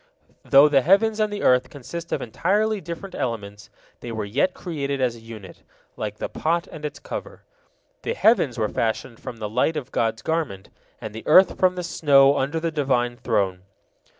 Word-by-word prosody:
Though 140 Hz, +2 st, +7 dB
the 140 Hz, -2 st, +4 dB
heavens 210 Hz, -, +3 dB
and 215 Hz, -1 st, +1 dB
the 205 Hz, -, -4 dB
earth 125 Hz, 0 st, +3 dB
consist 165 Hz, +5 st, -8 dB
of -, -, -1 dB
entirely 205 Hz, -, 0 dB
different 170 Hz, +4 st, -7 dB
elements, 105 Hz, -4 st, -5 dB, 0.3 s
they 120 Hz, -, -7 dB
were 110 Hz, -2 st, -3 dB
yet 140 Hz, -, 0 dB
created 140 Hz, -5 st, -3 dB
as 125 Hz, -2 st, 0 dB
a -, -, -12 dB
unit, 110 Hz, -5 st, -11 dB, 0.3 s
"like 105 Hz, -1 st, -5 dB
the -, -, -3 dB
pot 170 Hz, +2 st, -1 dB
and 155 Hz, -, -10 dB
its 150 Hz, -, -4 dB
cover." -, -, -8 dB, 0.6 s
The 470 Hz, -, -3 dB
heavens 185 Hz, -, +3 dB
were 110 Hz, -2 st, +1 dB
fashioned 115 Hz, +2 st, -2 dB
from 120 Hz, -, -8 dB
the 110 Hz, -2 st, -4 dB
light 125 Hz, +9 st, 0 dB
of 135 Hz, -3 st, -6 dB
God's 115 Hz, 0 st, -1 dB
garment, 155 Hz, -13 st, -2 dB, 0.3 s
and 110 Hz, -, -7 dB
the 110 Hz, -, -9 dB
earth 185 Hz, +4 st, +6 dB
from 185 Hz, -1 st, +3 dB
the 180 Hz, -, -4 dB
snow 140 Hz, -4 st, +4 dB
under 145 Hz, +5 st, -1 dB
the 165 Hz, 0 st, -2 dB
Divine 130 Hz, -5 st, 0 dB
Throne. 95 Hz, -6 st, -1 dB
140 Hz, 185 wpm, -23 LUFS, 115-170 Hz, 0.6 s, Though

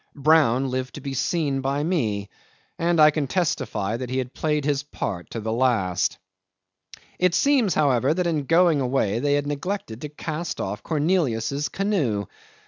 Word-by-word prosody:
Brown 135 Hz, -4 st, +3 dB
lived 130 Hz, 0 st, -3 dB
to -, -, -6 dB
be 140 Hz, -1 st, -5 dB
seen 140 Hz, -1 st, 0 dB
by 140 Hz, +2 st, -1 dB
me, 110 Hz, -, -1 dB, 0.5 s
and 170 Hz, 0 st, +1 dB
I 155 Hz, 0 st, +8 dB
can 150 Hz, -2 st, -2 dB
testify 115 Hz, -, -1 dB
that 125 Hz, 0 st, -5 dB
he 130 Hz, -, -2 dB
had 125 Hz, -1 st, -3 dB
played 150 Hz, -2 st, -1 dB
his 145 Hz, -2 st, +1 dB
part 95 Hz, -10 st, -5 dB
to 115 Hz, -, -5 dB
the 110 Hz, 0 st, -3 dB
last. 100 Hz, -9 st, +1 dB, 1.0 s
'It 180 Hz, -1 st, +3 dB
seems, 270 Hz, -9 st, +3 dB
however, 135 Hz, -3 st, +3 dB
that 180 Hz, +3 st, 0 dB
in 155 Hz, -4 st, 0 dB
going 165 Hz, -1 st, +4 dB
away 125 Hz, -5 st, 0 dB
they 145 Hz, +2 st, +2 dB
had 145 Hz, 0 st, 0 dB
neglected 145 Hz, -, -4 dB
to 150 Hz, -, -5 dB
cast 155 Hz, +3 st, -5 dB
off 105 Hz, +3 st, -3 dB
Cornelius's 150 Hz, -4 st, 0 dB
canoe. 155 Hz, -, 0 dB
140 Hz, 165 wpm, -24 LUFS, 120-160 Hz, 1.0 s, I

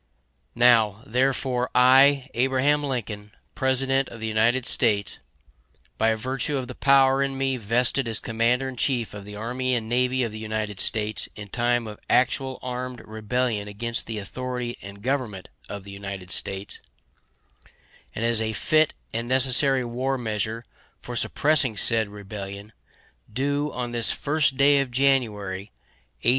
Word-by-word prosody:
Now, 115 Hz, -3 st, +4 dB
therefore, 125 Hz, 0 st, 0 dB
I, 135 Hz, +2 st, +6 dB
Abraham 135 Hz, +4 st, +2 dB
Lincoln, 105 Hz, -6 st, -4 dB, 0.2 s
President 135 Hz, 0 st, +1 dB
of 115 Hz, -, -10 dB
the 110 Hz, -, -4 dB
United 115 Hz, +3 st, +2 dB
States, 100 Hz, -4 st, +2 dB, 0.8 s
by 110 Hz, 0 st, +3 dB
virtue 130 Hz, +5 st, -2 dB
of 130 Hz, -2 st, -4 dB
the 125 Hz, -, -7 dB
power 135 Hz, 0 st, +4 dB
in 135 Hz, -1 st, -1 dB
me 135 Hz, 0 st, 0 dB
vested 120 Hz, +3 st, +1 dB
as 110 Hz, -2 st, 0 dB
Commander 115 Hz, +3 st, 0 dB
In 130 Hz, -1 st, -7 dB
Chief 120 Hz, -4 st, -1 dB
of 100 Hz, -1 st, -9 dB
the 105 Hz, 0 st, -9 dB
Army 125 Hz, +4 st, -1 dB
and 115 Hz, -2 st, -2 dB
Navy 125 Hz, +2 st, +1 dB
of 115 Hz, -, -2 dB
the 110 Hz, -, -7 dB
United 110 Hz, -2 st, -4 dB
States 110 Hz, 0 st, 0 dB
in 105 Hz, -1 st, -9 dB
time 120 Hz, +1 st, 0 dB
of 105 Hz, -1 st, -8 dB
actual 130 Hz, +1 st, +2 dB
armed 125 Hz, 0 st, -5 dB
rebellion 110 Hz, 0 st, -2 dB
against 115 Hz, +3 st, -2 dB
the 115 Hz, -1 st, -4 dB
authority 125 Hz, +3 st, -4 dB
and 100 Hz, +1 st, -11 dB
government 125 Hz, -8 st, -2 dB, 0.2 s
of 100 Hz, -1 st, -6 dB
the 100 Hz, -, -10 dB
United 100 Hz, -2 st, -7 dB
States, 95 Hz, +2 st, -2 dB, 1.4 s
and 115 Hz, -, -2 dB
as 115 Hz, -1 st, +3 dB
a 110 Hz, 0 st, -1 dB
fit 155 Hz, +8 st, +2 dB, 0.2 s
and 115 Hz, +1 st, -2 dB
necessary 130 Hz, 0 st, +3 dB
war 130 Hz, +3 st, -2 dB
measure 110 Hz, 0 st, -3 dB, 0.3 s
for -, -, -8 dB
supressing 145 Hz, -7 st, +2 dB
said 110 Hz, +1 st, +2 dB
rebellion, 100 Hz, 0 st, -8 dB, 0.6 s
do, 145 Hz, +4 st, -1 dB
on 125 Hz, -1 st, -4 dB
this 120 Hz, -2 st, +1 dB
1st 145 Hz, -2 st, 0 dB
day 140 Hz, +1 st, +5 dB
of 135 Hz, -2 st, -1 dB
January, 110 Hz, -7 st, 0 dB, 0.5 s
A. -, -, +4 dB
120 Hz, 150 wpm, -24 LUFS, 110-130 Hz, 1.4 s, I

